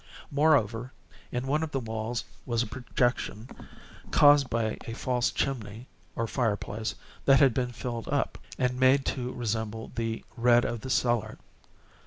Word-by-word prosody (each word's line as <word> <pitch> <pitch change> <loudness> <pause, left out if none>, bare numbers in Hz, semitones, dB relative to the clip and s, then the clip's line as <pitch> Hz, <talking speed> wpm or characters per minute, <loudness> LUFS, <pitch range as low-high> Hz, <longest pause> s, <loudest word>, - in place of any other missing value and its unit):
Moreover, 130 -5 +2 0.4
in 125 +1 -2
one 150 +3 +1
of 160 - -2
the 135 - -1
walls 110 0 -3 0.2
was 120 -1 0
a - - -4
projection, 120 -1 -1 0.6
caused 145 -2 +6
by 115 -1 -1
a 115 - -4
false 125 -1 0
chimney, 115 -3 -3 0.3
or 115 - 0
fireplace, 110 -2 -2 0.3
that 135 -1 +6
had 135 -5 +5
been 125 0 -1
filled 120 -1 -5
up, 145 -1 -1 0.2
and 125 0 0
made 130 +1 +5
to 125 -1 -2
resemble 110 -2 -3
the 115 -1 -3
red 120 0 +4
of 120 -2 -3
the 130 - -6
cellar. 120 -4 +1
120 Hz, 150 wpm, -28 LUFS, 115-130 Hz, 0.6 s, caused